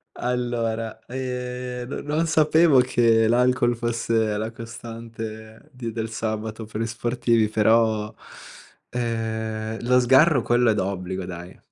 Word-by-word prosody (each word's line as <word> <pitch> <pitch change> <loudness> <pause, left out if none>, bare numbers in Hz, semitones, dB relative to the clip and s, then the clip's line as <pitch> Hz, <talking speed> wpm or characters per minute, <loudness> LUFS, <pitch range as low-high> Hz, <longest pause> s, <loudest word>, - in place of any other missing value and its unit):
Allora, 115 -3 -2
ehm, 125 -1 -5
no 135 - -5
non 150 +3 0
sapevo 160 -2 +5
che 115 -3 +3
l'alcol 120 +1 +3
fosse 115 -2 0
la 110 +2 -3
costante 115 0 -9
di 125 -4 -6
del 110 0 -4
sabato 110 0 -4
per 110 +1 -5
gli 115 - -1
sportivi, 120 -1 +1
però, 110 0 +2 0.8
ehm, 110 -2 -3
lo 125 0 +5
sgarro 135 +3 +5
quello 120 0 +3
è - - +2
d'obbligo 95 -2 -3
dai. 90 0 -9
115 Hz, 125 wpm, -24 LUFS, 110-125 Hz, 0.8 s, sapevo